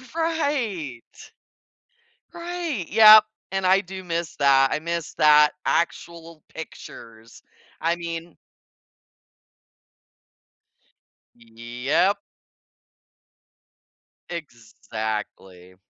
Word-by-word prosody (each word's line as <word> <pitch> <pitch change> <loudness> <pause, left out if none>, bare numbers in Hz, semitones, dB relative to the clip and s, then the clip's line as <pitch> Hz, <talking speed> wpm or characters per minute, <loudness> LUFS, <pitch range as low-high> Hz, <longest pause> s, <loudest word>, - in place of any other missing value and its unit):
Right. 270 - -2 1.3
Right, 340 - -4
yep, 215 0 +8 0.3
and 195 -1 -2
I 190 +1 +4
do 190 0 -9
miss 170 -2 -4
that. 135 -1 +4
I - - -1
miss 170 0 -4
that, 150 0 +5
actual 170 -1 -3
pictures, 115 -8 -11 0.4
I 170 +1 +1
mean 170 0 -7 3.0
Yep. 120 - -1 2.1
Exactly. 110 - -7
165 Hz, 65 wpm, -23 LUFS, 120-195 Hz, 3.0 s, yep